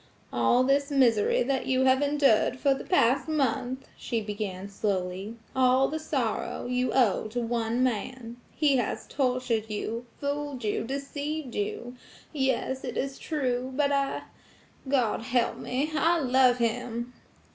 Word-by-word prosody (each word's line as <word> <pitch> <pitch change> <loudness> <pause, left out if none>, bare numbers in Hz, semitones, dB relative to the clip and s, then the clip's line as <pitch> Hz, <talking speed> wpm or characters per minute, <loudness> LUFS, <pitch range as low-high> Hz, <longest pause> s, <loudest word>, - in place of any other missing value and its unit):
"All 120 - +3
this 280 +2 +2
misery 245 -8 +3
that 265 +1 -1
you 260 0 +2
have 260 +1 +4
endured 280 -5 +3
for 275 +1 +3
the 270 - -6
past 265 -5 +2
month," 265 -3 -1
she 235 - -2
began 205 -3 -4
slowly,–"all 215 +7 0
the 315 - -3
sorrow, 265 -8 -2
you 250 +1 0
owe 230 -5 +2
to 230 +3 -3
one 235 +1 0
man. 240 0 -2
He 290 -3 +2
has 220 -2 -2
tortured 250 -5 -1
you, 230 +3 -4
fooled 285 -2 -3
you, 210 +1 -1
deceived 280 +1 -4
you–Yes, 260 +4 -3
it 245 - -4
is 270 0 -3
true; 255 -4 -2
but 285 0 +2
I–God 275 -3 -2
help 235 +1 0
me–I 305 +5 +1
love 255 -2 +4
him." 235 +1 -2
255 Hz, 130 wpm, -28 LUFS, 230-275 Hz, -, have